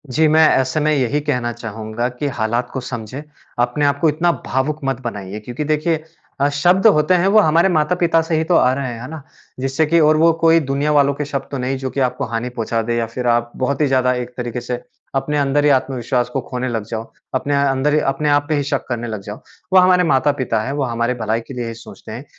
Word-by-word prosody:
जी 160 Hz, 0 st, +4 dB
मैं 155 Hz, +1 st, +5 dB
ऐसे 130 Hz, +3 st, 0 dB
में 155 Hz, 0 st, +1 dB
यही 140 Hz, +1 st, +1 dB
कहना 125 Hz, -5 st, -1 dB
चाहूँगा 110 Hz, 0 st, -4 dB
कि 125 Hz, +4 st, -4 dB
हालात 120 Hz, +2 st, -1 dB
को 130 Hz, -, -2 dB
समझें। 125 Hz, +2 st, -6 dB, 0.4 s
अपने 120 Hz, +5 st, +1 dB
आपको 145 Hz, +3 st, +2 dB
इतना 170 Hz, +3 st, +1 dB
भावुक 140 Hz, +4 st, -1 dB
मत 135 Hz, -2 st, -1 dB
बनाइए 105 Hz, -3 st, -5 dB
क्योंकि 120 Hz, +7 st, -5 dB
देखिए 155 Hz, +1 st, 0 dB, 0.4 s
अ, 140 Hz, -, +4 dB
शब्द 175 Hz, +8 st, +3 dB
होते 155 Hz, -3 st, +4 dB
हैं 180 Hz, +3 st, +2 dB
वो 215 Hz, +2 st, +5 dB
हमारे 170 Hz, +1 st, +4 dB
माता-पिता 165 Hz, 0 st, +2 dB
से 160 Hz, 0 st, -2 dB
ही 160 Hz, -, +1 dB
तो 170 Hz, +1 st, +1 dB
आ 125 Hz, -, +4 dB
रहे 135 Hz, -1 st, -3 dB
हैं, 115 Hz, -, -8 dB
है 125 Hz, -, -7 dB
ना? 160 Hz, -2 st, -7 dB, 0.4 s
जिससे 135 Hz, +4 st, 0 dB
कि 165 Hz, +2 st, +3 dB
और 155 Hz, 0 st, +4 dB
वो 165 Hz, +1 st, +5 dB
कोई 165 Hz, 0 st, +5 dB
दुनिया 140 Hz, +1 st, -1 dB
वालों 140 Hz, -1 st, +3 dB
के 150 Hz, +1 st, -4 dB
शब्द 140 Hz, -1 st, -4 dB
तो 140 Hz, -, -3 dB
नहीं 130 Hz, +1 st, -2 dB
जो 130 Hz, 0 st, -4 dB
कि 140 Hz, -, -4 dB
आपको 130 Hz, +2 st, 0 dB
हानि 115 Hz, +1 st, -3 dB
पहुँचा 115 Hz, -1 st, -2 dB
दे 120 Hz, +1 st, -2 dB
या 115 Hz, -, 0 dB
फ़िर 120 Hz, +2 st, -4 dB
आप 120 Hz, 0 st, +1 dB
बहुत 140 Hz, +3 st, -1 dB
ही 145 Hz, -, +3 dB
ज़्यादा 130 Hz, -1 st, +2 dB
एक 125 Hz, -1 st, -4 dB
तरीके 120 Hz, 0 st, -4 dB
से 120 Hz, 0 st, -4 dB, 0.4 s
अपने 145 Hz, +2 st, 0 dB
अंदर 140 Hz, +1 st, +1 dB
ही -, -, +5 dB
आत्मविश्वास 125 Hz, -1 st, -2 dB
को 135 Hz, +2 st, -2 dB
खोने 125 Hz, 0 st, -3 dB
लग 115 Hz, -3 st, -2 dB
जाओ, 115 Hz, 0 st, -5 dB, 0.2 s
अपने 140 Hz, +2 st, 0 dB
अंदर, 140 Hz, +2 st, +1 dB
अपने 135 Hz, +2 st, 0 dB
आप 145 Hz, 0 st, +3 dB
पे 155 Hz, -, +2 dB
ही 145 Hz, -, 0 dB
शक 140 Hz, -1 st, -2 dB
करने 120 Hz, -1 st, -3 dB
लग 110 Hz, -3 st, -5 dB
जाओ। 105 Hz, +2 st, -8 dB, 0.4 s
वो 190 Hz, -, +8 dB
हमारे 180 Hz, 0 st, +5 dB
माता-पिता 135 Hz, -6 st, +1 dB
हैं, 135 Hz, -, -3 dB
वो 145 Hz, -1 st, -1 dB
हमारे 115 Hz, 0 st, -1 dB
भलाई 110 Hz, +1 st, 0 dB
के -, -, -8 dB
लिए 120 Hz, -2 st, -4 dB
ही 115 Hz, -, -5 dB
सोचते 115 Hz, -1 st, -12 dB
हैं, 120 Hz, +6 st, -7 dB
135 Hz, 240 wpm, -19 LUFS, 120-150 Hz, 0.4 s, वो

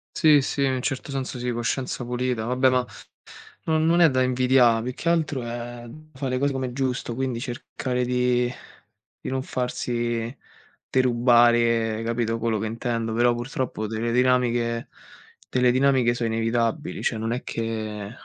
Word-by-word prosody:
Sì 150 Hz, -4 st, +5 dB
sì, 140 Hz, +1 st, -2 dB
in 135 Hz, -, +2 dB
un 130 Hz, -, -2 dB
certo 135 Hz, 0 st, -3 dB
senso 135 Hz, -1 st, -4 dB
sì, 125 Hz, 0 st, -2 dB
coscienza 125 Hz, +2 st, -2 dB
pulita. 125 Hz, -1 st, -2 dB
Vabbè, 125 Hz, +3 st, +2 dB
ma 125 Hz, -1 st, +2 dB, 0.8 s
non 160 Hz, 0 st, +2 dB
non 170 Hz, +1 st, +4 dB
è 165 Hz, -, +7 dB
da 130 Hz, -1 st, +2 dB
invidiare, 125 Hz, -2 st, +3 dB
più 125 Hz, +2 st, -4 dB
che -, -, -6 dB
altro 160 Hz, -6 st, +1 dB
è 120 Hz, 0 st, -6 dB, 0.3 s
fa 135 Hz, 0 st, -4 dB
le 130 Hz, 0 st, -1 dB
cose 140 Hz, +1 st, +1 dB
com'è 130 Hz, -2 st, -3 dB
giusto, 130 Hz, -2 st, -2 dB
quindi 130 Hz, -1 st, -2 dB
cercare 125 Hz, +1 st, -3 dB
di 125 Hz, 0 st, +1 dB, 0.7 s
di -, -, -5 dB
non 130 Hz, 0 st, -2 dB
farsi 120 Hz, -1 st, -2 dB, 0.5 s
derubare, 120 Hz, -3 st, +3 dB
capito, 115 Hz, 0 st, -1 dB
quello 115 Hz, -1 st, 0 dB
che 105 Hz, -, -3 dB
intendo. 115 Hz, 0 st, -2 dB
Però 120 Hz, +1 st, +3 dB
purtroppo 120 Hz, -2 st, -3 dB
delle 110 Hz, +2 st, -2 dB
dinamiche 120 Hz, -2 st, +1 dB, 0.6 s
delle 125 Hz, -1 st, +2 dB
dinamiche 130 Hz, -2 st, +3 dB
so 120 Hz, -, -3 dB
inevitabili, 115 Hz, +5 st, -1 dB
cioè 115 Hz, -, 0 dB
non 115 Hz, +1 st, -2 dB
è 125 Hz, +2 st, -3 dB
che 110 Hz, -2 st, -4 dB
125 Hz, 160 wpm, -24 LUFS, 115-130 Hz, 0.8 s, è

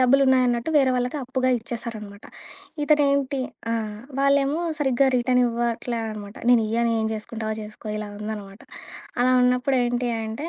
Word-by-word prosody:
డబ్బులన్నాయన్నట్టు, 255 Hz, 0 st, +3 dB
వేరే 270 Hz, -3 st, +4 dB
వాళ్ళకి 250 Hz, +3 st, -1 dB
అప్పుగా 255 Hz, 0 st, 0 dB
ఇచ్చేశారనమాట. 220 Hz, -3 st, -7 dB, 0.6 s
ఇతనేంటి 280 Hz, -2 st, +2 dB, 0.3 s
ఆ! -, -, +1 dB, 0.4 s
వాళ్ళేమో 280 Hz, +2 st, +2 dB, 0.2 s
సరిగ్గా 270 Hz, -2 st, +2 dB
రిటర్న్ 250 Hz, +1 st, +2 dB
ఇవ్వట్లే 235 Hz, 0 st, -2 dB
అనమాట. 210 Hz, -1 st, -7 dB
నేనియ్యను, 235 Hz, -1 st, +3 dB
ఏం 220 Hz, -, 0 dB
జేసుకుంటావో 220 Hz, 0 st, -4 dB
చేసుకో 210 Hz, +1 st, -11 dB
ఇలా 210 Hz, 0 st, -5 dB
ఉందనమాట. 210 Hz, -1 st, -7 dB, 0.6 s
అలా 255 Hz, +1 st, +4 dB
ఉన్నప్పుడేంటి 250 Hz, -1 st, +1 dB, 0.2 s
అంటే, 225 Hz, +9 st, -5 dB
245 Hz, 120 wpm, -24 LUFS, 220-265 Hz, 0.6 s, వేరే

